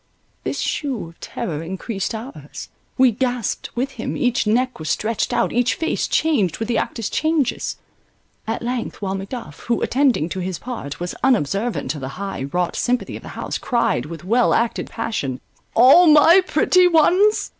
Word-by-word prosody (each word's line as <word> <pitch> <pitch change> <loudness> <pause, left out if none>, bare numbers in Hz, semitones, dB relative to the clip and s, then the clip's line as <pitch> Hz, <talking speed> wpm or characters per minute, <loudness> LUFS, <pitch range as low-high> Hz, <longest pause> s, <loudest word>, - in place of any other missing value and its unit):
This - - -3
shew 265 - -2
of 165 - -20
terror 155 -4 -4
encreased 190 +5 -4
ours, 240 +6 -8 0.3
we 260 -1 +5
gasped 245 -1 -2
with 260 +3 -1
him, 235 -4 -5
each 245 -2 +1
neck 250 +2 +1
was 155 - -4
stretched 225 +1 -1
out, - - +1
each 245 +1 +2
face 325 - -1
changed 250 - +1
with 225 +1 -4
the 240 - +1
actor's 230 -3 -3
changes— 310 -5 0 0.7
at 225 +1 -3
length 240 -3 -4
while 190 -1 -1
Macduff, 195 - -6
who, 235 -1 +1
attending 260 - +2
to 190 - -4
his 185 -1 -3
part, 230 - -6
was 175 0 -4
unobservant 210 - +1
of 150 - -8
the 130 - -4
high 195 -8 -4
wrought 180 -1 -1
sympathy 250 0 -1
of - - -8
the - - -10
house, - - -3
cried 235 - 0
with 165 +1 -8
well 235 +6 +3
acted 230 0 -1
passion: 210 - -3 0.4
All 265 +10 +7
my 320 +4 +7
pretty 360 +4 +4
ones? 360 +6 +3
235 Hz, 170 wpm, -21 LUFS, 190-260 Hz, 0.7 s, All